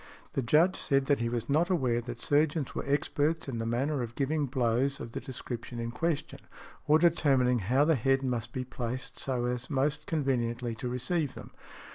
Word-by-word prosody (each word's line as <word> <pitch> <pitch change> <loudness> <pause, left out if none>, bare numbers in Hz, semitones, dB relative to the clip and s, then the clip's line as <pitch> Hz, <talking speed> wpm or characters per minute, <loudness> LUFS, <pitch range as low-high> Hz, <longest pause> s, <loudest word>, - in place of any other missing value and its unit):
The - - 0
Judge 155 +9 +4
said 135 -1 +1
that 145 0 +2
he 115 0 0
was 120 -1 -2
not 155 +5 +2
aware 130 -10 +1
that 120 0 -7
surgeons 145 +1 +1
were - - -3
experts 150 +2 0
in 120 -4 -3
the 115 - -2
manner 135 +4 0
of 120 -1 -5
giving 145 +1 0
blows 130 +1 +1
of 115 - -7
the - - -4
description 120 -2 -6
in 115 0 -3
question, 160 +4 -2 0.5
or 150 +1 +6
determining 140 -7 +3
how 125 +9 +2
the 160 - +4
head 135 0 +2
must 120 -3 -2
be 130 - -3
placed 125 0 -5
so 125 -3 -1
as 125 +1 -2
most 145 +1 0
conveniently 120 -5 -1
to 120 +3 -4
receive 125 +4 -1
them. - - -10
130 Hz, 190 wpm, -30 LUFS, 120-145 Hz, 0.5 s, or